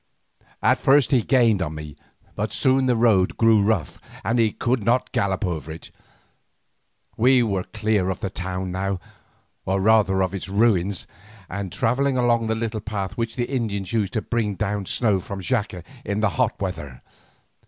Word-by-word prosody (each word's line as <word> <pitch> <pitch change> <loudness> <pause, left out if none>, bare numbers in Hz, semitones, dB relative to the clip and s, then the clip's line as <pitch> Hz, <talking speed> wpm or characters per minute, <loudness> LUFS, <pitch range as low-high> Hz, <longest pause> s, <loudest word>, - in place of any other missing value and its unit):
At - - +3
first 140 +1 +4
he 130 -3 +4
gained 115 -5 +3
on 80 -3 -3
me, 75 -1 -8 0.4
but - - -2
soon 130 0 +2
the 125 - +3
road 110 -6 +3
grew 115 -2 +5
rough, 100 -7 -1 0.2
and 120 +2 0
he 110 -2 +3
could 120 +1 -1
not 120 +4 +1
gallop 95 0 0
over 80 -4 -4
it. 80 +2 -10 1.3
We 125 +2 +5
were 100 -5 -1
clear 105 -3 0
of 95 - -3
the 95 - -4
town 90 0 -4
now, 95 +1 -2 0.6
or 95 +1 0
rather 95 -2 +3
of 95 0 -2
its 95 0 -5
ruins, 100 -3 +1 0.4
and 95 +1 -5
travelling 130 +6 +1
along 120 -2 +2
a 110 - +1
little 110 -1 -3
path 100 -3 -4
which 115 -1 -3
the 120 - -1
Indians 110 -7 -3
used 105 -4 0
to 110 - -1
bring 110 -4 -1
down 100 -1 -2
snow 105 -6 +1
from 95 +2 -7
Xaca 105 -4 -2 0.2
in 100 +1 -2
the 110 -1 +2
hot 80 - -1
weather. 75 -10 -5
105 Hz, 175 wpm, -23 LUFS, 95-115 Hz, 1.3 s, grew